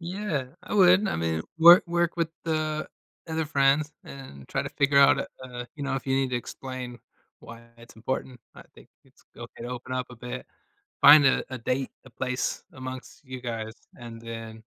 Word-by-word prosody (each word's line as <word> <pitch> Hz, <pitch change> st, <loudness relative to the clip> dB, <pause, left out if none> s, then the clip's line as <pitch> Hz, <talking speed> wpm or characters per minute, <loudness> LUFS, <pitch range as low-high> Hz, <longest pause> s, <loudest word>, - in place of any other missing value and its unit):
yeah, 170 Hz, -7 st, -4 dB
I -, -, -6 dB
would. 190 Hz, +1 st, +6 dB
I -, -, -1 dB
mean, 80 Hz, -1 st, -1 dB, 0.2 s
wor 170 Hz, +2 st, +9 dB
work 170 Hz, 0 st, 0 dB
with 165 Hz, -1 st, 0 dB, 0.2 s
the 155 Hz, -1 st, -2 dB, 0.4 s
other 160 Hz, 0 st, -1 dB
friends 145 Hz, +1 st, +2 dB
and 130 Hz, -, -11 dB
try -, -, -1 dB
to -, -, -5 dB
figure 140 Hz, 0 st, +2 dB
out, 140 Hz, -, +6 dB
uh -, -, -2 dB, 0.2 s
uh, 125 Hz, -1 st, -7 dB
you 150 Hz, -, -8 dB
know, 140 Hz, -1 st, -2 dB
if 135 Hz, -, -5 dB
you 135 Hz, -, +1 dB
need 135 Hz, -1 st, 0 dB
to 125 Hz, -, 0 dB
explain 125 Hz, 0 st, -7 dB, 0.4 s
why 115 Hz, 0 st, -12 dB
it's 115 Hz, 0 st, -16 dB
important, 125 Hz, +2 st, -4 dB
I -, -, -12 dB
think -, -, -17 dB, 0.2 s
it's -, -, -26 dB
okay -, -, -10 dB
to 120 Hz, -, -5 dB
open 125 Hz, +1 st, -6 dB
up 130 Hz, -1 st, -2 dB
a 125 Hz, -, -11 dB
bit, 125 Hz, +1 st, -7 dB, 0.6 s
find 145 Hz, 0 st, +9 dB
a 135 Hz, -, +3 dB
a -, -, -3 dB
date, 125 Hz, +3 st, -2 dB
a 130 Hz, -, -13 dB
place 125 Hz, +2 st, -3 dB
amongst 130 Hz, +1 st, -9 dB
you 130 Hz, -2 st, -8 dB
guys 115 Hz, -2 st, -5 dB, 0.2 s
and 115 Hz, -2 st, -10 dB
then 115 Hz, -1 st, -8 dB
130 Hz, 195 wpm, -26 LUFS, 120-150 Hz, 0.6 s, wor